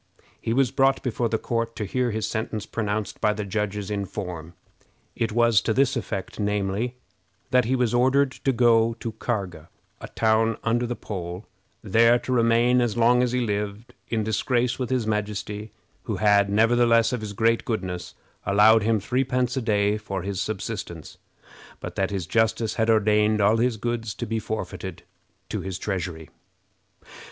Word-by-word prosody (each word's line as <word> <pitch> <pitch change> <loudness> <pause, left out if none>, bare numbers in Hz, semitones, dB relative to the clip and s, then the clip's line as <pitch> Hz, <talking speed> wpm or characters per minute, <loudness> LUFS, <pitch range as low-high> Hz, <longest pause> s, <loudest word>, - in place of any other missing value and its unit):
He - - -2
was 125 0 +2
brought 135 0 +2
before 120 -2 -1
the 110 - +1
court 115 0 -2
to 105 - -3
hear 125 +5 0
his 110 -1 -2
sentence 110 -1 -3
pronounced 105 -2 -3
by 105 - +3
the 105 -1 -4
judges 105 0 -3
in 100 -1 -2
form. 90 -4 -7 0.6
It 115 -1 -1
was 115 -2 +4
to 110 - -1
this 135 0 +3
effect, 100 -4 -4
namely, 105 +3 -1 0.6
"That 125 -2 +4
he 130 +3 +1
was 125 -3 +1
ordered 130 +3 +3
to 135 - -1
go 115 -2 +3
to 115 0 -5
Karga, 95 -8 -4 0.3
a - - -8
town 110 0 +1
under 120 +2 +1
the 120 - -3
pole, 90 -2 -6 0.4
there 115 +3 +5
to 130 - -6
remain, 120 +1 +3
as 120 -2 -1
long 120 +1 +4
as 125 -1 +1
he 125 0 0
lived, 105 0 -3
in 110 -2 -1
disgrace 120 +4 0
with 125 -2 -2
his 125 -3 0
majesty, 105 0 -3 0.3
who - - -2
had, 100 -1 +3
nevertheless, 115 +2 +3
of 125 - -2
his 105 -1 -5
great 115 +2 +2
goodness, 90 -7 -4 0.3
allowed 105 +3 +5
him 110 +1 +2
threepence 125 +2 0
a 130 - -1
day 105 -2 +1
for 95 -3 -5
his 100 -1 -3
subsistence; 100 0 -5 0.6
but - - -7
that 95 - 0
his 95 -4 -3
justice 110 +3 +1
had 110 0 0
ordained 105 -1 +3
all 105 +2 +4
his 120 0 +1
goods 115 -1 -3
to 120 - -4
be 115 0 -2
forfeited 95 -4 -5 0.5
to - - -3
his 95 -2 -5
treasury." 90 -6 -4
110 Hz, 170 wpm, -25 LUFS, 105-120 Hz, 0.6 s, there